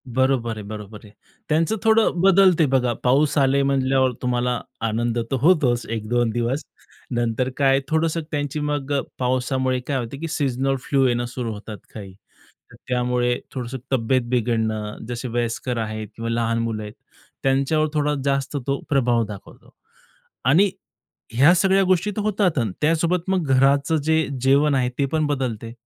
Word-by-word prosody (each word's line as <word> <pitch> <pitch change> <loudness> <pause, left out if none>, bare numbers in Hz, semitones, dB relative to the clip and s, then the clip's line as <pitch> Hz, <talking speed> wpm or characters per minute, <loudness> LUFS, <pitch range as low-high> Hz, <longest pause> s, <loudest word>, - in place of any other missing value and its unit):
बरोबर 125 -2 0
आहे. 105 - -6
बरोबर 105 0 -8
आहे. 105 - -15 0.4
त्यांचं 165 +7 +2
थोडं 220 -1 +4
बदलते 185 -3 +5
बघा 130 -3 +1
पाऊस 140 +4 +3
आले 140 0 +3
म्हणल्यावर 135 -1 +2
तुम्हाला 125 -1 0 0.3
आनंद 115 +2 -1
तर - - +2
होतोच 140 -8 +3
1-2 115 +2 0
दिवस. 120 +5 -1 0.5
नंतर 120 +1 0
काय 135 -1 +4
थोडंसं 160 +2 0
त्यांची 145 0 -2
मग 145 -1 -2
अ, 140 - +1 0.2
पावसामुळे 130 0 0
काय 140 - 0
होते 120 +2 -5
की 165 - -4
सीझनल 135 -3 0
फ्लू 135 0 +1
येणं 120 0 0
सुरू 120 -1 -4
होतात 105 0 -8 0.2
काही. 100 -4 -9 0.6
तर - - -14
त्यामुळे 125 -1 0
थोडंसं 130 0 -5
तब्येत 130 0 +2
बिघडणं, 110 -3 -1
जसे 120 +1 -4
वयस्कर 120 +1 -2
आहेत 110 -1 -4
किंवा 115 0 -4
लहान 115 0 0
मुलं 115 -2 -2
आहेत. 105 0 -8 0.5
त्यांच्यावर 140 +3 +2
थोडा 150 -1 +1
जास्त 140 +1 0
तो 140 0 0
प्रभाव 120 -4 +2
दाखवतो. 105 -2 -12 0.7
आणि 170 +11 +4 0.6
ह्या 140 +9 +6
सगळ्या 195 +1 +3
गोष्टी 185 +2 +2
तर - - -1
होतात 200 -6 +1
अन् 115 -5 0
त्यासोबत 165 +3 +1
मग 185 -4 0
घराचं 140 +4 +3
जे 160 0 +2 0.2
जेवण 140 +2 +4
आहे 130 -2 +1
ते 140 - +2
पण 155 -1 +1
बदलते. 125 -6 -3
130 Hz, 155 wpm, -22 LUFS, 120-150 Hz, 0.7 s, ह्या